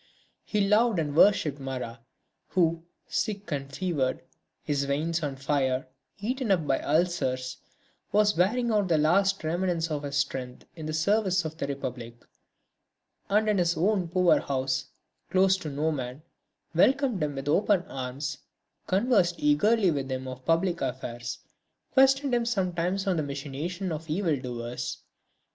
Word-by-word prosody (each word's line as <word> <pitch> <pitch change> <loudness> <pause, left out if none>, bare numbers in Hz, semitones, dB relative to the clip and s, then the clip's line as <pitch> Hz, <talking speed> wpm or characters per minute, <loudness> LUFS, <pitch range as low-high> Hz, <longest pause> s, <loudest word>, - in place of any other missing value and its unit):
He 205 -2 0
loved 215 +1 +4
and 145 -3 -1
worshipped 160 -6 +4
Marat, 130 -3 -5 0.5
who, 165 -2 +1 0.2
sick 205 -4 -2
and 140 -1 -3
fevered, 145 -5 -1 0.4
his 140 -1 0
veins 160 +4 -1
on 145 -3 -2
fire, 135 -1 0 0.3
eaten 245 +4 -2
up 180 -5 +2
by 135 - +1
ulcers, 150 -6 0 0.5
was 210 0 +3
wearing 230 +8 +2
out 205 -3 +2
the 165 -3 +3
last 190 +6 +3
remnants 170 0 -1
of 150 -1 -1
his 140 -1 -3
strength 130 -3 -3
in 160 -2 -6
the 155 - -3
service 185 +2 +2
of 160 0 -4
the 140 - -2
Republic, 125 -4 -5 1.1
and 210 +2 +3
in 210 -3 +2
his 170 -1 +1
own 190 0 +2
poor 180 0 +4
house, 130 0 -1 0.4
closed 190 0 +3
to 155 - -4
no 150 +3 0
man, 130 0 -5 0.5
welcomed 255 - +3
him 145 -2 -1
with 135 +1 -5
open 190 +4 +3
arms, 135 +1 -5 0.5
conversed 190 -3 +3
eagerly 185 +7 +3
with 135 -3 -3
him 130 0 -3
of 130 0 -7
public 170 +2 +1
affairs, 120 -2 -4 0.6
questioned 270 0 +4
him 240 -1 +2
sometimes 185 -3 0
on 190 -3 +1
the - - +1
machinations 145 +7 -4
of 160 +1 -5
evil 165 -1 +1
doers. 120 -2 -5
165 Hz, 150 wpm, -27 LUFS, 140-195 Hz, 1.1 s, loved